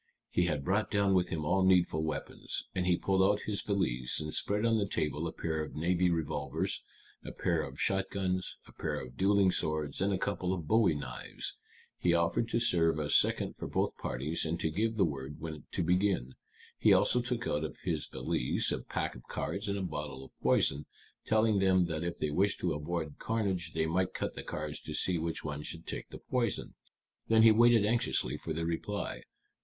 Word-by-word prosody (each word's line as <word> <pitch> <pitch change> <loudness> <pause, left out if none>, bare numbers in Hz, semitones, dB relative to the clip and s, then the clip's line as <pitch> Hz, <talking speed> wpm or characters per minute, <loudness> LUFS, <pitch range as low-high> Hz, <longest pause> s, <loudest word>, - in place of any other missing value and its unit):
He 90 - +2
had 75 -4 -1
brought 95 +2 +1
down 100 -1 +2
with 90 -1 +2
him 80 -2 -2
all 95 +4 +2
needful 90 -4 +3
weapons. 80 - -3
And 90 -1 -1
he 90 -1 +4
pulled 95 -1 +1
out 100 +2 +3
his 105 -2 -1
valise, 65 - 0
and 75 0 -4
spread 105 +2 +1
on 115 -1 +3
the 100 - 0
table 80 -2 -1
a - - -3
pair 80 -1 -2
of - - -8
navy 90 +3 +2
revolvers, 80 -3 -1 0.4
a - - -6
pair - - 0
of - - -7
shotguns, 95 -1 -1
a - - -14
pair - - -3
of 65 -1 -9
dueling 100 -1 +4
swords, 75 -3 -1
and 100 +1 +2
a 95 - +1
couple 95 -1 -1
of 85 -5 -5
bowie 105 -4 +4
knives. 70 - -5 0.4
He 85 -1 +3
offered 85 +7 +1
to 115 - +1
serve 80 -8 +3
as 75 -1 +1
second - - +3
for - - -5
both - - 0
parties, 75 +6 -2
and 85 +1 -2
to 80 - 0
give 110 +6 0
the 100 -4 +4
word 70 -1 -5
when 80 -2 -7
to - - 0
begin. 90 -7 +1 0.5
He - - +5
also 125 - +4
took 120 0 -2
out 75 +1 0
of 75 -4 -5
his - - -2
valise - - 0
a - - -1
pack - - -3
of - - -11
cards 100 +2 -3
and 100 0 -1
a 95 - -2
bottle 75 -5 -5
of - - -16
poison, 70 +2 +2 0.4
telling 110 -2 +3
them 95 -1 +4
that 80 -2 -2
if 85 0 -3
they 75 - -1
wished 100 +6 +1
to 90 - +1
avoid 75 0 -4
carnage 95 -7 -1
they 80 0 +1
might 90 +3 0
cut - - -2
the - - -5
cards 75 -1 -5
to 75 - -6
see 90 +2 +1
which 80 0 -3
one 75 -1 -4
should 85 +2 -5
take - - -5
the - - -8
poison. 120 -4 -2 0.5
Then 110 0 +5
he 110 - +9
waited 115 -1 +5
anxiously 115 +2 +1
for 80 - -6
their 80 +1 -1
reply. 85 +5 -3
90 Hz, 205 wpm, -32 LUFS, 80-100 Hz, 0.5 s, he